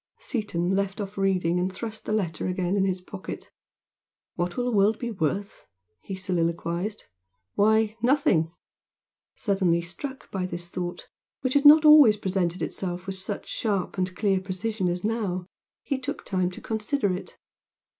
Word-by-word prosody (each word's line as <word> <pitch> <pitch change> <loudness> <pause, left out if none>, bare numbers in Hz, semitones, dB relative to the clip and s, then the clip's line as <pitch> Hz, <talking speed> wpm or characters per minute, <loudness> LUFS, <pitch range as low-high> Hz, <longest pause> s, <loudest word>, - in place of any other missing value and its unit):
Seaton 210 - -2
left 195 +1 -1
off 200 0 -5
reading 180 -3 +1
and 185 +1 0
thrust 220 +3 -7
the - - -3
letter 185 -8 -1
again 185 0 0
in 195 -1 +2
his 185 -1 -1
pocket. 185 +1 -8 0.8
"What 175 0 -2
will 245 - 0
the 245 -3 0
world 205 +2 +4
be 240 -1 -4
worth?" 195 +2 -3 0.3
he 195 - -6
soliloquised 175 +2 -2 0.5
"Why, 220 +1 +3
nothing!" 240 - +3 0.8
Suddenly 190 -5 +1
struck 265 +11 -8
by 185 -2 -2
this 175 -1 -5
thought, 175 0 -5 0.3
which 255 -1 0
had 285 0 +3
not 305 +2 +9
always 295 -8 +8
presented 185 -3 -1
itself 180 -1 -4
with 195 - -3
such 200 +1 -5
sharp 200 -5 -1
and 185 0 -1
clear 195 -1 +2
precision 190 +1 -2
as 175 +1 -2
now, 205 -5 -1 0.4
he 275 -2 -1
took 260 - -5
time 185 -2 0
to 180 - -10
consider 220 -1 0
it. 180 - -7
195 Hz, 155 wpm, -26 LUFS, 180-220 Hz, 0.8 s, not